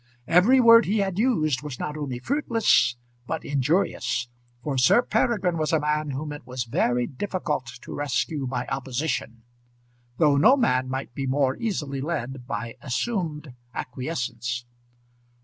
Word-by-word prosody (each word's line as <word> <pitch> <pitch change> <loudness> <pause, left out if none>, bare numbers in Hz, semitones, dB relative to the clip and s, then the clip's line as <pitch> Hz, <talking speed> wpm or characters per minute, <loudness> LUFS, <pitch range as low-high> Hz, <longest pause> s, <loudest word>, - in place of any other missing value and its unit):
Every 185 - +5
word 230 -1 +8
he 210 +4 +1
had 195 -2 -1
used 155 - +2
was 145 -4 -6
not 150 - -3
only 140 -5 -4
fruitless, 225 - +2 0.3
but 160 -1 -3
injurious; 135 -4 0 0.3
for 145 -3 -2
Sir 130 - +5
Peregrine 185 -8 +1
was 155 -1 0
a 160 - +3
man 150 0 0
whom 145 +2 -4
it 145 - -8
was 125 -1 -4
very 120 +1 +1
difficult 150 -3 -3 0.2
to - - -8
rescue 145 0 -1
by 125 -1 -2
opposition, 125 -3 -3 0.7
though 150 -3 +4
no 255 - +6
man 130 - +1
might 130 -2 -4
be 135 0 -3
more 135 0 +1
easily 150 - -3
led 135 -5 -4
by 120 -3 -4
assumed 150 - -3 0.2
acquiescence. 125 -2 -4
145 Hz, 145 wpm, -25 LUFS, 130-170 Hz, 0.7 s, word